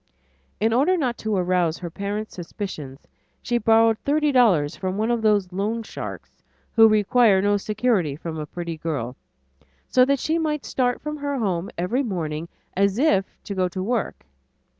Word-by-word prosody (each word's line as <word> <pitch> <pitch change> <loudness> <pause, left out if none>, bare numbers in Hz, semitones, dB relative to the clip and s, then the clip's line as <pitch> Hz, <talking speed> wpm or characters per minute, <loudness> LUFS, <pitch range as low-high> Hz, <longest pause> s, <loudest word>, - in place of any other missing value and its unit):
In 225 +2 +2
order 300 +10 +3
not 255 -7 0
to 220 -1 -1
arouse 180 -3 +1
her 175 -2 -7
parents' 205 +4 -4
suspicions, 160 -6 -7 0.4
she 240 -1 0
borrowed 225 0 +4
thirty 300 +1 +1
dollars 185 - +3
from 185 0 -3
one 220 +3 0
of 235 -1 0
those 205 -4 +2
loan 215 +4 -1
sharks - - -8 0.3
who 225 -1 +7
require 215 0 +4
no 205 +1 +2
security 210 - 0
from 160 +1 -6
a 150 - -5
pretty 170 0 -5
girl, 140 -7 -3 0.7
so 255 - +4
that 280 +1 +2
she 320 +5 0
might 300 -3 -2
start 245 -2 0
from 300 +1 -4
home 220 - -2
every 180 +10 0
morning 170 - -3 0.3
as 200 +1 +2
if 220 -9 +3 0.2
to 200 - -5
go 185 -1 +1
to 185 +1 -4
work. 230 +1 -2
205 Hz, 165 wpm, -23 LUFS, 180-245 Hz, 0.7 s, who